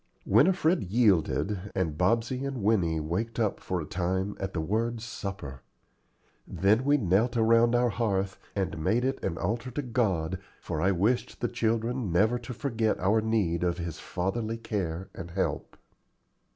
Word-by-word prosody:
Winifred 180 -2 +4
yielded, 100 -1 +1
and 80 -6 0
Bobsey 115 - +1
and 135 -5 -3
Winnie 90 -7 +2
waked 90 +10 -3
up 110 -3 0
for 90 - -2
a 80 - -4
time 95 +4 -1
at 95 -1 -3
the 85 - -3
word 115 +8 -1
"supper." 95 - -6 0.9
Then 105 +6 +2
we 145 +1 +4
knelt 110 +3 +2
around 115 +1 +4
our 120 0 +3
hearth, 100 -4 -1 0.2
and 95 -5 -2
made 120 +8 +2
it 135 0 -2
an 80 - -2
altar 115 +8 -2
to 145 +4 -3
God, 95 -9 0 0.2
for 75 - -4
I 95 - +3
wished 115 +7 0
the 120 - 0
children 115 -1 -1
never 110 +8 +3
to 120 +2 -8
forget 115 -3 -1
our 105 +4 +3
need 100 -7 0
of 90 -1 0
His 85 -3 -5
fatherly 110 +5 -2
care 95 -5 -3
and 85 - -7
help. 95 +2 -2
105 Hz, 160 wpm, -28 LUFS, 90-120 Hz, 0.9 s, Winifred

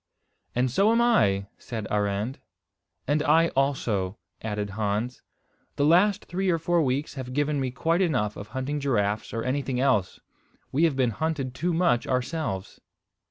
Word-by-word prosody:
"And 125 +1 +1
so 200 - +4
am 230 - +3
I," 105 - +3
said 110 -3 -5
Arend. 105 +4 -1 0.7
"And 150 +1 +2
I 160 +3 +4
also," 115 -8 0 0.2
added 105 -2 -3
Hans. 110 +4 -2 0.5
"The 145 - +2
last 180 +6 +4
three 190 +2 -1
or 170 - +3
four 170 +1 +1
weeks 135 +1 -1
have 130 -2 -6
given 145 +1 0
me 130 -1 -1
quite 165 +7 0
enough 125 - +1
of 100 - -8
hunting 130 +5 -3
giraffes, 105 -7 0
or 115 -1 -3
anything 130 0 -1
else. 125 -9 +1 0.5
We 155 +5 +3
have 155 -5 +1
been 130 -3 +2
hunted 140 0 -2
too 165 +8 -1
much 165 -8 +2
ourselves." 125 - -2
130 Hz, 160 wpm, -26 LUFS, 110-160 Hz, 0.7 s, so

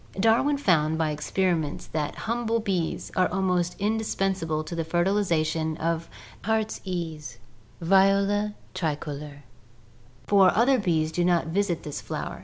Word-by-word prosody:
Darwin 230 +7 +3
found 160 - +2
by 160 -1 0
experiments 160 0 -1
that 150 -2 -3
humble 230 0 0
bees 185 -6 -2
are 185 - +2
almost 180 -2 0
indispensable 195 -6 -1
to 155 - -8
the 165 -1 -1
fertilization 165 -3 0
of 165 0 -2 0.3
the - - -11
heartsease 175 - -3 0.4
(Viola 195 +3 +3 0.2
tricolor), 150 -4 -4 0.8
for 195 -2 +6
other 255 +3 +4
bees 160 -6 +1
do 175 +1 0
not 175 -2 +2
visit 185 -1 0
this 150 - -5
flower. - - -5
175 Hz, 125 wpm, -26 LUFS, 160-200 Hz, 0.8 s, for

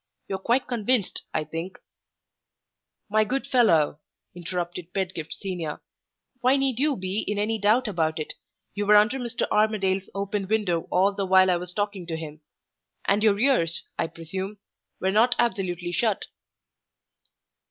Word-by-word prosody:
You - - -4
are - - 0
quite 240 +6 +1
convinced, 240 -3 0
I 155 - -1
think 165 +4 -6 0.7
" - - -58
"My 215 - +6
good 265 +6 -2
fellow," 165 - +3 0.3
interrupted 175 0 -5
Pedgift 185 -5 -3
Senior, 175 -6 -4 0.6
"why 255 +2 +4
need 270 -3 0
you 290 -2 +2
be 190 +2 -2
in 210 - -3
any 215 +2 0
doubt 220 +5 +3
about 160 -5 0
it? 155 - -4 0.4
You 205 0 -2
were 210 - +7
under 215 +6 +4
Mr. 240 -1 -2
Armadale's 195 -3 +1
open 200 0 -2
window 195 -6 0
all 190 +3 +3
the 195 -1 -2
while 185 0 +6
I 175 - +2
was 180 +1 -7
talking 205 -2 -3
to 165 -1 -3
him; 155 -1 -8 0.6
and 205 +1 +2
your 210 -2 +4
ears, 210 - +2 0.2
I - - +1
presume, 190 +6 -6 0.4
were 190 - +1
not 230 +5 +4
absolutely 180 -7 -1
shut." 215 +2 0
195 Hz, 155 wpm, -25 LUFS, 175-220 Hz, 0.7 s, were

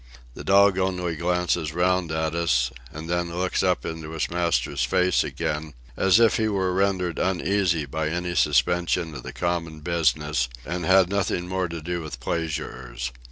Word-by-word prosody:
The - - -9
dog 100 0 +5
only 90 -3 -1
glances 85 -1 0
round 90 -1 +1
at 80 0 -1
us, 65 -8 +1 0.2
and 80 +2 -8
then 85 0 -2
looks 90 0 0
up 90 -1 +1
into 80 -1 -5
his 80 - -2
master's 80 -6 0
face 90 +7 +2
again, 75 -1 -3 0.2
as 95 +3 +4
if 115 -1 +5
he 110 - +1
were 95 -3 0
rendered 95 -2 0
uneasy 90 -3 +1
by 75 +3 -2
any 90 +2 -2
suspension 85 +3 +2
of 65 - -7
the - - -7
common 85 -3 -3
business, 75 -5 +1 0.2
and 85 +1 -3
had 95 -1 +6
nothing 95 -3 -1
more 95 0 -1
to 85 -2 -7
do 85 +1 -3
with 75 -6 -7
pleasurers. 65 -5 -4
85 Hz, 165 wpm, -25 LUFS, 80-90 Hz, 0.2 s, had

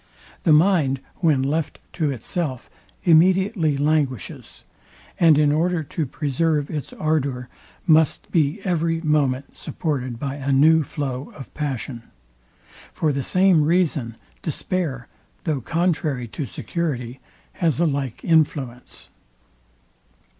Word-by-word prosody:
The 165 - +5
mind, 155 -4 +4 0.2
when 150 -6 +2
left 150 +3 -1 0.2
to 155 -4 0
itself, 135 +1 -3 0.3
immediately 180 -1 +3
languishes; 145 - -2 0.6
and 165 -4 +6
in 150 -1 +4
order 165 +2 +1
to 150 +1 -3
preserve 150 +2 -1
its 150 -3 -4
ardour, 140 -5 -1 0.4
must 160 -3 +3
be 155 +3 +1
every 165 -2 0
moment 140 -4 0
supported 130 -7 -3
by 140 +3 -4
a 140 0 -2
new 155 +4 +5
flow 135 -2 -4
of 135 -6 -11
passion. 135 -4 -4 0.9
For 155 -2 0
the 140 - -1
same 185 +3 +4
reason, 150 -8 +1 0.2
despair, 155 -5 -3 0.4
though 150 -5 -1
contrary 155 -5 -1
to 140 +4 -5
security, 125 - -4 0.4
has 165 -5 +1
a 170 - +3
like 140 -6 -2
influence. 145 -6 0
150 Hz, 115 wpm, -22 LUFS, 135-165 Hz, 0.9 s, and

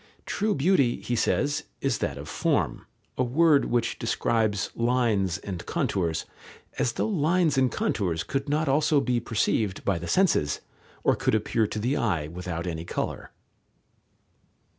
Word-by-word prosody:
True 210 +1 0
beauty, 140 -5 +2
he 120 - -2
says, 145 +5 0
is - - 0
that - - -2
of - - -8
form, - - -1 0.3
a - - +4
word 145 +4 +4
which 120 -1 0
describes 110 -3 0
lines 115 -7 +1
and 95 -3 -6
contours, 85 -4 -1 0.5
as 120 - +1
though - - -1
lines 170 -4 +2
and 130 -2 +3
contours 85 -5 -1
could 135 - -3
not 155 +2 +1
also 150 +2 +3
be 125 -3 +1
perceived 110 -3 -1
by 95 -4 +1
the 85 - -6
senses, 170 - +2 0.4
or - - +4
could - - +1
appear 110 +1 +1
to 110 - -5
the 125 +7 0
eye 85 -10 0
without 85 0 -5
any 80 -2 -3
colour. - - -4
120 Hz, 150 wpm, -26 LUFS, 95-140 Hz, 0.5 s, a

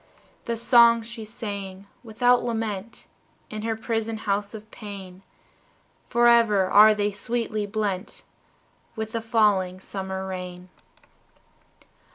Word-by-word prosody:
The 235 -1 -2
songs 235 -1 +5
she 230 -1 -8
sang, 200 -4 -7 0.2
without 245 +2 +2
lament, 225 -2 -4 0.5
In 215 0 -5
her 225 0 -2
prison 225 0 -3
house 205 0 -2
of 215 0 -11
pain, 195 -3 -9 0.9
Forever 235 -4 +4
are 215 +3 +7
they 205 0 0
sweetly 215 0 -3
blent 205 -2 -3 0.7
With 220 -1 -4
the 230 -1 -3
falling 205 -5 +1
summer 190 0 -5
rain. 180 -1 -7
215 Hz, 110 wpm, -25 LUFS, 195-230 Hz, 0.9 s, are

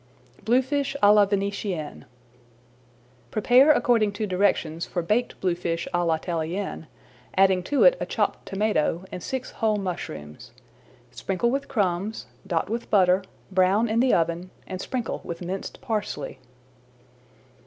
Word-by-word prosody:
BLUEFISH 270 +4 +1
À 205 0 +8
LA 210 -1 +6
VENETIENNE 200 -5 -3 1.2
Prepare 250 +7 +5
according 230 -7 +3
to 215 +1 -2
directions 180 -4 0
for 175 - -2
Baked 220 +8 0
Bluefish 170 -2 -1
à 175 0 +2
la 165 - +3
Italienne, 170 +1 -4 0.5
adding 190 -1 +5
to 280 +10 +1
it - - +6
a - - -3
chopped - - -1
tomato 195 -4 0
and 180 - -6
six 260 +7 -4
whole 220 -2 0
mushrooms. 120 - -6 0.6
Sprinkle 185 - -1
with 275 +1 -2
crumbs, 200 0 -1 0.2
dot 170 -4 0
with 230 +2 -4
butter, 190 -2 +4 0.3
brown 190 +4 +3
in 220 +1 +1
the 255 +1 +4
oven, 170 +2 0 0.2
and 185 0 -6
sprinkle 245 -4 -3
with 170 +1 -6
minced 190 +2 -5
parsley. 220 -6 -3
195 Hz, 135 wpm, -25 LUFS, 175-225 Hz, 1.2 s, À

